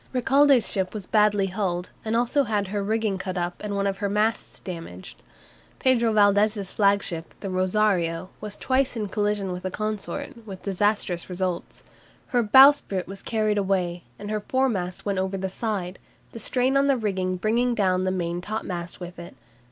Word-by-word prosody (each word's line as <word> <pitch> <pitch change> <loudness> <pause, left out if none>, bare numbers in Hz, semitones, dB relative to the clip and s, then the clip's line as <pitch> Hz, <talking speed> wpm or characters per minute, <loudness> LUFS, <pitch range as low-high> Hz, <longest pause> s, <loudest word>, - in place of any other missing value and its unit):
Recalde's 270 0 +4
ship 190 0 -1
was 205 -3 -5
badly 210 -1 +3
hulled, 185 -2 -2
and 220 +1 -1
also 245 +4 +2
had 205 -3 -1
her 205 0 -2
rigging 215 -1 0
cut 185 -1 -4
up 175 0 -3
and 205 -1 -3
one 200 0 0
of 195 -1 -1
her 200 - -1
masts 215 +2 -1
damaged. 165 - -8 0.6
Pedro 235 -3 +3
Valdes's 205 -1 +3
flagship, 200 -5 0
the 195 - -5
"Rosario," 185 -2 +1
was 210 -1 -6
twice 260 0 +1
in 210 -3 -3
collision 205 -1 -1
with 180 0 -5
a 185 - -2
consort, 215 +3 -5
with 190 -2 -8
disastrous 195 -3 0
results. 180 -1 -3 0.5
Her 245 - +2
bowsprit 265 -4 +6
was 195 +1 -7
carried 215 -2 0
away, 180 -3 -1
and 205 +1 -6
her 215 -1 -1
foremast 205 -8 -1
went 200 -2 0
over 190 +1 -1
the 190 0 -3
side, 190 -3 -3 0.3
the 230 - -8
strain 255 +3 +1
on 275 0 +3
the 275 -2 +3
rigging 190 -4 -1
bringing 235 +6 +1
down 185 -3 +2
the 185 - +1
main 175 -2 -2
topmast 180 -4 -5
with 175 -1 -8
it. 170 +1 -10
200 Hz, 175 wpm, -25 LUFS, 185-220 Hz, 0.6 s, bowsprit